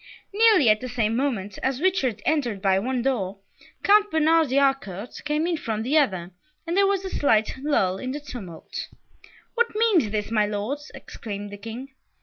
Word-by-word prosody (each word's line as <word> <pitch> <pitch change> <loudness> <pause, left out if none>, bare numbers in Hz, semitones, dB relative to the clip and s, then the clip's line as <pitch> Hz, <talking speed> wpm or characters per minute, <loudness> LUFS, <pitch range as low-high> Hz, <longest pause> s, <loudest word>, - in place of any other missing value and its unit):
Nearly 425 - +5
at 215 0 +4
the 255 - -5
same 225 -2 0
moment 225 -7 -2
as 265 -1 -1
Richard 275 - 0
entered 255 -10 0
by 190 -1 +2
one 250 +3 -2
door, 200 -8 -1 0.5
Count 415 +1 +5
Bernard 320 -2 +3
de 265 - +1
Harcourt 270 -7 0
came 300 +2 0
in 345 -1 0
from 220 -6 -3
the 265 +6 0
other, 185 - -1 0.3
and 335 +1 -2
there 395 0 +4
was 390 -1 0
a - - -3
slight 225 -2 +1
lull 195 -10 +1
in 255 - -4
the 290 - -4
tumult. 240 - -8 0.7
"What 470 -2 0
means 425 - +3
this, 210 +1 -3
my 215 -2 +2
Lords?" 225 +9 -4
exclaimed 205 -2 -7
the 205 - -8
King. 230 +6 -8
255 Hz, 180 wpm, -24 LUFS, 210-310 Hz, 0.7 s, Nearly